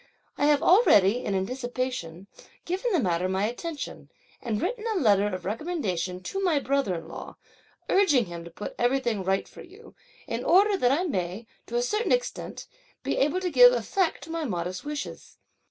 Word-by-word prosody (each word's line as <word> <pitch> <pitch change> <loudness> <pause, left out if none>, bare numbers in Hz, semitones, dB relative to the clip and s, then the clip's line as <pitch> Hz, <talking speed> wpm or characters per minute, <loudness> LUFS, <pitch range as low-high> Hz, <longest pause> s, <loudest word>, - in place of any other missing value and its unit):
I 290 - 0
have 295 -1 +3
already, 245 - +5
in 200 - -1
anticipation, 245 -4 -3 0.4
given 380 +7 -1
the 360 - +3
matter 180 -4 0
my 190 +2 0
attention, 290 +7 -6 0.3
and 225 -4 -2
written 430 - -2
a 425 - 0
letter 205 - +4
of 185 -3 -5
recommendation 195 - -3
to 390 - -3
my 345 -5 +2
brother 275 -9 0
in 165 - -7
law, - - -9 0.5
urging 305 - +3
him 170 -2 -8
to 170 - -10
put 190 +5 -7
everything 240 -4 +1
right 190 +1 0
for - - -13
you, 390 +6 -15 0.3
in - - -4
order 400 +4 +5
that 250 -9 +2
I 305 +6 +2
may, 190 - -3 0.2
to 235 - -6
a 240 - +2
certain 425 - -1
extent, - - -2 0.4
be - - -1
able 300 +7 +1
to 360 -1 -2
give 250 -3 +8
effect 300 - -1
to 325 - -9
my 330 -1 -2
modest 180 - -3
wishes. 295 0 -6
250 Hz, 180 wpm, -26 LUFS, -, 0.5 s, give